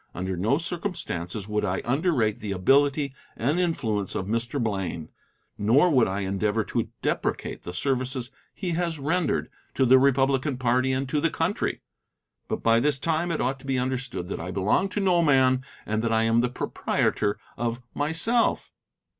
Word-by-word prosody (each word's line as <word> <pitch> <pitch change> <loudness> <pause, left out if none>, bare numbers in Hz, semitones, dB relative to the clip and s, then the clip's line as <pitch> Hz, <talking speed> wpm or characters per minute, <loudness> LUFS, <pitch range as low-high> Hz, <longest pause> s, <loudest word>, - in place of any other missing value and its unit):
Under 95 0 -2
no 105 +10 +1
circumstances 160 - -4
would 105 0 -1
I 95 -2 0
underrate 125 - +1
the 105 -4 -3
ability 140 +8 +3 0.2
and 145 +9 +1
influence 115 - -1
of 95 - -2
Mr. 115 +6 -2
Blaine, 95 -8 -2 0.5
nor 135 - +4
would 130 -5 +4
I 95 +2 -2
endeavor 105 +3 0
to - - -2
deprecate - - -2
the 90 - -7
services 130 +4 -2 0.2
he 185 -3 -4
has 170 -1 -1
rendered 160 +3 0 0.2
to 135 - +3
the 130 +1 +7
Republican 135 0 +2
party 130 +1 +2
and 130 +1 -1
to 145 +3 0
the 165 - +2
country. 165 +6 -1 0.6
But - - -3
by 115 0 +5
this 145 +3 +1
time 165 +4 0
it 155 - -1
ought 135 +2 -1
to 135 - -13
be 135 -1 +1
understood 125 -7 -2
that - - -4
I 85 +3 -5
belong 100 - +1
to 205 - -2
no 185 -3 +3
man, 130 -4 +4 0.2
that 110 +2 -1
I 110 0 +3
am 115 +1 +3
the 125 - +1
proprietor 105 -4 -1 0.2
of 120 0 -2
myself. 165 +11 +1
130 Hz, 170 wpm, -26 LUFS, 110-150 Hz, 0.6 s, the